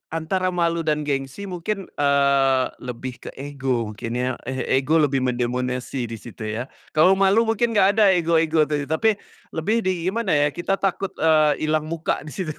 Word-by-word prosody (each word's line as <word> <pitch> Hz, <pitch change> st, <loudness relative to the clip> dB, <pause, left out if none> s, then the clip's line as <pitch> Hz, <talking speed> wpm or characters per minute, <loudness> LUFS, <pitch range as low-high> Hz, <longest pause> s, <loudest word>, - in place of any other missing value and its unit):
antara 185 Hz, +3 st, -1 dB
malu 170 Hz, -1 st, +1 dB
dan 150 Hz, -2 st, 0 dB
gengsi 135 Hz, +5 st, -3 dB
mungkin. 190 Hz, +1 st, -4 dB
eee, 140 Hz, -2 st, +3 dB
lebih 125 Hz, 0 st, -7 dB
ke -, -, -3 dB
ego 130 Hz, -6 st, -2 dB
mungkin 115 Hz, +3 st, -5 dB
ya, 125 Hz, 0 st, -1 dB
eh 130 Hz, -1 st, -3 dB
ego 150 Hz, +4 st, 0 dB
lebih 140 Hz, -3 st, +2 dB
mendominasi 125 Hz, 0 st, -2 dB
di 115 Hz, -, -6 dB
situ 115 Hz, -2 st, -10 dB
ya. 115 Hz, +5 st, -4 dB, 0.3 s
Kalau 180 Hz, +5 st, +6 dB
malu 195 Hz, +4 st, +4 dB
mungkin 230 Hz, +1 st, +1 dB
enggak 200 Hz, 0 st, +4 dB
ada 200 Hz, -2 st, +6 dB
ego-ego 165 Hz, -2 st, +2 dB
itu, 145 Hz, -2 st, -2 dB
tapi 210 Hz, +8 st, +2 dB, 0.4 s
lebih 210 Hz, +9 st, +1 dB
di 185 Hz, -2 st, -1 dB
gimana 215 Hz, 0 st, -1 dB
ya 145 Hz, 0 st, +4 dB
kita 195 Hz, +3 st, -1 dB
takut, 195 Hz, 0 st, -1 dB
eee, 155 Hz, -1 st, +3 dB
ilang 155 Hz, 0 st, +1 dB
muka 165 Hz, -2 st, -2 dB
di 150 Hz, -, -9 dB
situ. 160 Hz, -6 st, -4 dB
155 Hz, 175 wpm, -23 LUFS, 130-185 Hz, 0.4 s, Kalau